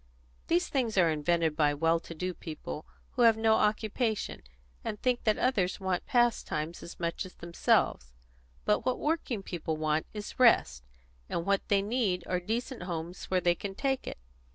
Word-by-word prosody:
These 350 +2 +2
things 240 -7 -1
are 170 -3 +5
invented 160 +1 +1
by 145 -2 +3
well 165 +2 +2
to 165 - -10
do 180 +3 -3
people 155 -2 -7 0.2
who 250 - -2
have 230 -2 +6
no 220 0 +4
occupation, 215 +1 0 0.4
and 210 - -4
think 250 -2 0
that 215 -1 +3
others 205 -9 +1
want 190 -2 -2
pastimes 215 -10 +1
as 170 - -10
much 170 -1 -2
as 185 - -11
themselves. 170 - +1 0.5
But 105 - +2
what 255 - 0
working 295 -9 -1
people 165 -4 -3
want 155 0 0
is 210 +2 -7
rest, 65 - +4 0.5
and 170 - -2
what 200 0 +2
they 200 -1 +3
need 205 -5 0
are 180 - 0
decent 230 +6 -3
homes 175 0 -5
where 185 -1 +1
they 175 -1 +4
can 195 +2 -6
take 270 +3 -1
it. - - -5
190 Hz, 175 wpm, -30 LUFS, 165-225 Hz, 0.5 s, have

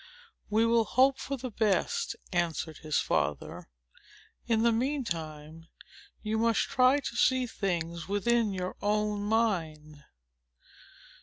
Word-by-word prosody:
"We 220 +2 +3
will 230 -1 +3
hope 265 +3 +3
for 275 - -4
the 255 -1 -6
best," 225 - 0 0.2
answered 165 -3 -1
his 155 -2 -1
father. 75 -4 -2 0.8
"In 225 -1 +2
the 235 - +4
mean 265 +5 0
time, 160 -4 -6 0.6
you 220 0 -1
must 230 0 +2
try 255 +2 +3
to 250 - -6
see 260 +1 +3
things 170 -6 -3
within 215 +2 +1
your 185 -1 -4
own 210 0 0
mind." 165 -9 -1
210 Hz, 125 wpm, -29 LUFS, 170-235 Hz, 0.8 s, the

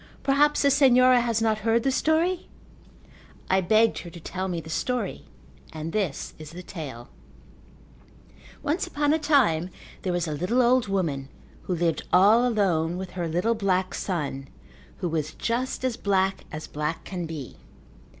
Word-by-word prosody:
Perhaps 290 +2 +3
the 280 - +4
Senhora 255 -2 +6
has 230 -2 0
not 220 -1 +1
heard 225 +2 +1
the 270 - +2
story?" 325 +6 +1 1.0
I 190 0 +4
begged 220 +5 +3
her 175 - -8
to 170 - -11
tell 185 +3 -4
me 175 -2 -2
the 160 - -10
story 250 +8 -2 0.5
and 160 +1 -5
this 195 -10 -2
is 155 -1 -9
the 175 +3 -9
tale: 140 -11 -8 1.5
Once 310 +4 -1
upon 290 0 +1
a 320 - +2
time 235 - +3 0.3
there 185 - -2
was 175 -1 -1
a - - -3
little 185 - +1
old 245 -1 +3
woman 155 -9 -1 0.4
who 180 - -1
lived 170 -1 0
all 215 +7 +6
alone 180 -7 +1
with 185 -1 -6
her 175 -2 -3
little 180 +8 +1
black 190 -4 0
son 145 -7 -3 0.5
who 180 - -2
was 155 -2 -2
just 250 +3 -2
as 250 -3 -1
black 195 -1 0
as 155 +1 -6
black 150 +2 -3
can 180 -3 -5
be. 155 -6 -7
190 Hz, 160 wpm, -26 LUFS, 165-245 Hz, 1.5 s, Senhora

